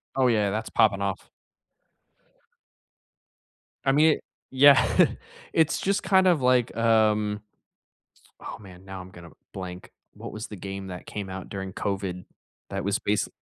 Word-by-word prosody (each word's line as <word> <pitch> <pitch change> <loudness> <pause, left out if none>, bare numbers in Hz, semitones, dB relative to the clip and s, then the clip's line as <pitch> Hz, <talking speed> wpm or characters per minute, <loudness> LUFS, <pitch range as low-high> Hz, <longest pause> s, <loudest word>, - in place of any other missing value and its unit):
Oh, 130 -1 +3
yeah, 105 -4 +2
that's 110 +2 -3
popping 100 -3 +3
off. 100 0 -3 2.6
I 135 - +4
mean, 150 +3 +4
it - - -12 0.3
Yeah. 140 +1 +7 0.7
It's 160 -2 +2
just 195 +1 0
kind 190 -2 +4
of 170 -6 +3
like, 125 -2 +2
um 110 -2 +2 1.0
oh, - - -8
man, 95 -3 -14
now 95 -1 -8
I'm 90 0 -10
gonna 85 -2 -13 0.2
blank. 90 -1 -8 0.2
What - - -9
was 110 +1 -6
the 105 - -8
game 95 +1 -7
that 90 -1 -8
came 100 -2 -6
out 95 -1 -7
during 95 -1 -6
COVID 95 -3 -3 0.5
that 95 0 -3
was 100 0 0
base 105 0 0
105 Hz, 150 wpm, -26 LUFS, 95-120 Hz, 2.6 s, Yeah